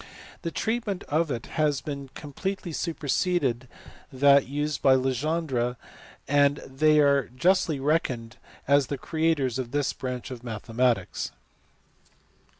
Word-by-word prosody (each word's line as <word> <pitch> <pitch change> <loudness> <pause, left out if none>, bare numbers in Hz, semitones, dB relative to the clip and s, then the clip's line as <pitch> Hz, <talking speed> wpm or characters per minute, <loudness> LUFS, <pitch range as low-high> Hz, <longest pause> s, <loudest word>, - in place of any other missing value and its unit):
Their 165 - -3
treat 230 +4 -2
ment 195 -3 -3
of 160 +2 0
it 120 -4 -3 0.2
has 145 -3 +1 0.3
completely 175 +5 -5
superseded 145 -5 -1 0.4
that 140 +1 +5
used 145 +2 -2
by 135 -1 +6
Legendre, 130 -1 0 0.5
and 145 0 +4
they 150 +3 +3
are 140 -3 +4
justly 155 +3 +2
reckoned 135 -6 -1 0.3
as 140 -1 +4
the 140 - -3
creators 155 -5 0
of 125 -2 -3
this 145 +1 0
branch 125 -1 -5
of 125 -2 -8
mathematics. 115 -2 -1
140 Hz, 120 wpm, -26 LUFS, 130-155 Hz, 0.5 s, by